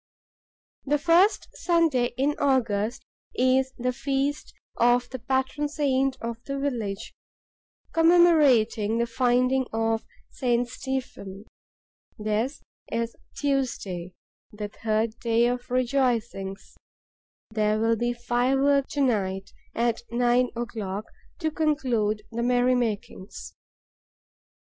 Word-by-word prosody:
The 295 +2 +1
first 345 +7 +3
Sunday 315 -9 +1
in 280 +3 +2
August 235 -5 +1 0.3
is 260 +1 +2
the 250 +1 -1
feast 275 +2 -2 0.3
of 245 +1 +3
the 260 - -5
patron 265 +4 -1
saint 270 -3 0
of 230 0 -5
the 275 0 -3
village, 230 -8 -3 0.8
commemorating 295 -11 +4
the 235 - +2
Finding 250 +2 +2
of 225 0 0 0.3
St. 245 -2 0
Stephen. 240 -6 -5 0.7
This 215 +5 -2 0.3
is 230 0 -2 0.2
Tuesday, 220 -11 -2 0.4
the 210 0 -6
third 220 +1 -1
day 230 0 +2
of 245 0 -1
the - - -7
rejoicings. 240 -7 -1 0.8
There 215 -1 +1
will 225 +1 +2
be 240 +2 0
fireworks 265 +4 +1
to 285 - +1
night, 195 -6 0 0.2
at 235 -1 0
nine 245 +1 +2
o'clock, 215 -4 -4 0.4
to 315 -1 0
conclude 250 -10 0
the 235 +1 -3
merry 245 +1 +3
makings. 215 -5 -3
245 Hz, 105 wpm, -26 LUFS, 225-270 Hz, 0.8 s, commemorating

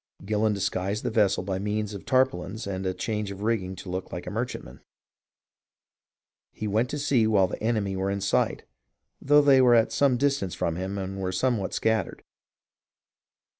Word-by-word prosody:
Gillon 105 +1 +1
disguised 100 0 -2
his - - -2
vessel 100 -4 +2
by 95 0 -3
means 105 +1 -2
of 100 - -9
tarpaulins 125 -5 0
and 95 -1 -3
a 95 - 0
change 105 -2 -3
of 100 +1 -7
rigging 100 -5 -1
to 95 - -9
look 95 +1 -4
like - - -6
a - - -5
merchantman. - - -5 1.7
He 110 - -5
went 110 +5 +1
to 150 - -3
sea 130 -6 +2
while 100 -3 +4
the - - -6
enemy 105 -4 0
were 95 +1 -1
in 100 0 -1
sight, 100 - 0 0.6
though 145 +1 +5
they 135 -2 +6
were 125 -2 +6
at 115 -1 +3
some 135 -3 +2
distance 135 -9 0
from 85 - -1
him 95 +3 -4
and 95 0 -5
were 95 -1 -1
somewhat 105 0 0
scattered. 110 -1 -1
105 Hz, 175 wpm, -26 LUFS, 95-115 Hz, 1.7 s, they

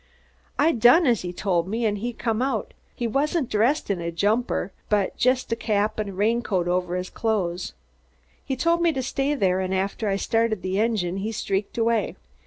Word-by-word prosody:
I 315 +3 +4
done 245 +8 +5
as 240 -6 +3
he 180 - -4
told 180 -2 0
me, 225 +4 -1
an' 205 -1 +1
he 235 +4 -3
come 225 -1 -2
out. 255 -5 -1 0.2
He 240 - -3
wasn't 280 +4 0
dressed 230 +4 +2
in 185 -3 -2
a 170 0 -3
jumper, 205 +2 0 0.2
but 205 -2 +1
just 255 -1 +1
had 230 - -1
a - - -13
cap 215 0 0
an' 210 -1 -2
a - - -7
rain 220 +5 +1
coat 185 -7 -1
over 180 0 0
his 180 0 -4
clothes. 190 -6 -1 0.7
He 270 - -2
told 335 +6 +1
me 340 -1 +4
to 265 -2 -2
stay 275 +3 0
there, 190 -7 +1
and 190 0 -1
after 195 +3 -1
I 195 - +1
started 225 0 0
the 185 +1 -1
engine, 210 -5 0
he 210 +3 -3
streaked 200 -1 -2
away. 230 -1 +1
215 Hz, 205 wpm, -24 LUFS, 190-240 Hz, 0.7 s, done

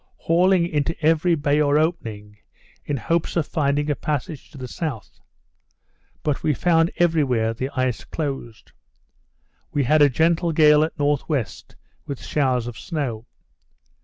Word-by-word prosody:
hauling 180 +1 +3
into 160 0 -2
every 165 +2 +3
bay 145 0 +1
or 145 0 +3
opening, 110 -11 -2 0.5
in 145 - -2
hopes 165 +6 -1
of 170 -4 +1
finding 145 -2 0
a 145 - 0
passage 150 +1 -4
to 145 - -14
the 130 -1 -6
south. 140 -4 -6 1.0
But 150 -3 -1
we 150 - +1
found 165 +1 +3
every 165 -3 +3
where 115 -4 0
the 130 +4 -4
ice 130 -5 -1
closed. 135 -7 -6 1.0
We 145 - 0
had 150 +4 +3
a 145 - +7
gentle 165 +4 +1
gale 150 -1 +6
at 160 - -2
N.W. 145 -1 +2 0.9
with 140 -3 -6
showers 130 -5 0
of 120 -4 -7
snow. 125 -8 -4
145 Hz, 145 wpm, -22 LUFS, 130-165 Hz, 1.0 s, a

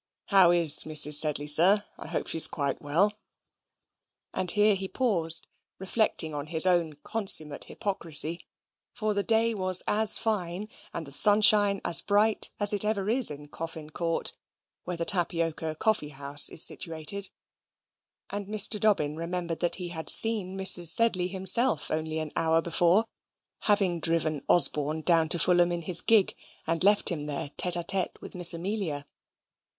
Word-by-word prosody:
How 190 -3 +4
is 170 -3 +4
Mrs. 150 -1 -2
Sedley, 150 -1 +3
sir? 180 +8 +1
I - - -10
hope - - -5
she's 165 - +1
quite 140 -3 -5
well." 170 +9 -1 1.2
And 185 - -3
here 210 +3 +3
he 195 0 -5
paused, 175 -10 +2 0.3
reflecting 190 -5 -1
on 145 0 -6
his 160 +2 +3
own 175 -4 0
consummate 175 -9 -1
hypocrisy; 170 -4 -5 0.5
for 215 -1 -3
the 200 - -2
day 225 +2 0
was 185 -3 +4
as 215 0 +4
fine, 205 -2 -4 0.2
and 165 - -7
the 140 - -13
sunshine 205 +3 +3
as 170 - +5
bright 210 +1 -1
as 205 0 +3
it 205 - +2
ever 210 -1 -3
is 255 +1 +5
in 145 0 -11
Coffin 160 -1 -10
Court, 165 +1 -2 0.5
where 180 -1 -6
the 170 - -4
Tapioca 165 -4 -2
Coffee 210 -5 -2
house 140 0 +3
is 165 - +5
situated: 165 +5 -3 1.0
and 200 -1 -6
Mr. 215 0 +1
Dobbin 175 -9 -1
remembered 170 0 -5
that 175 - +1
he 180 -2 -6
had 160 -2 -6
seen 205 -4 +4
Mrs. 185 -3 +2
Sedley 185 -2 +2
himself 190 - 0
only 155 0 -4
an 155 -1 -6
hour 165 0 0
before, 175 +5 0 0.6
having 195 -5 0
driven 160 -3 0
Osborne 155 -2 +1
down 165 -2 +1
to 170 - +1
Fulham 175 0 +1
in 170 -1 -5
his 170 0 +3
gig, 220 -4 +1 0.3
and 165 +1 -3
left 205 +1 +3
him 150 -4 -6
there 145 -1 -4
tete 180 -1 -1
a 175 - -4
tete 190 +1 -2
with - - -12
Miss 175 -1 +6
Amelia. 170 -5 -5
175 Hz, 160 wpm, -25 LUFS, 160-205 Hz, 1.2 s, Miss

